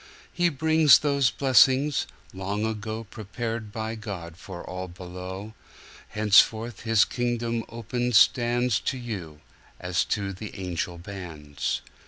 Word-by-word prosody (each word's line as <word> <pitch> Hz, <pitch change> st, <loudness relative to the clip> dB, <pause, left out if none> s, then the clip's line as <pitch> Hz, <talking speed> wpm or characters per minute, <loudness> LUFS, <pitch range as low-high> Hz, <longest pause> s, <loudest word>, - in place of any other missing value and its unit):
He 175 Hz, -1 st, +2 dB
brings 160 Hz, -2 st, +5 dB
those 140 Hz, -3 st, +2 dB
blessings, 135 Hz, +1 st, +4 dB, 0.3 s
long 100 Hz, +3 st, -3 dB
agoPrepared 110 Hz, 0 st, -4 dB
by 110 Hz, +1 st, -4 dB
God 95 Hz, -7 st, -7 dB
for 90 Hz, 0 st, -9 dB
all 90 Hz, 0 st, -5 dB
below; 90 Hz, +3 st, -8 dB, 0.5 s
Henceforth 110 Hz, +1 st, +3 dB
His 115 Hz, -2 st, +4 dB
kingdom 120 Hz, -1 st, -2 dB
open 120 Hz, +2 st, -3 dB
standsTo 120 Hz, +1 st, +3 dB
you, 90 Hz, -11 st, -7 dB, 0.4 s
as 90 Hz, 0 st, 0 dB
to 100 Hz, -2 st, -2 dB
the 100 Hz, +1 st, -8 dB
angel 90 Hz, -1 st, -3 dB
bands. 85 Hz, -6 st, -5 dB
110 Hz, 110 wpm, -26 LUFS, 95-120 Hz, 0.5 s, brings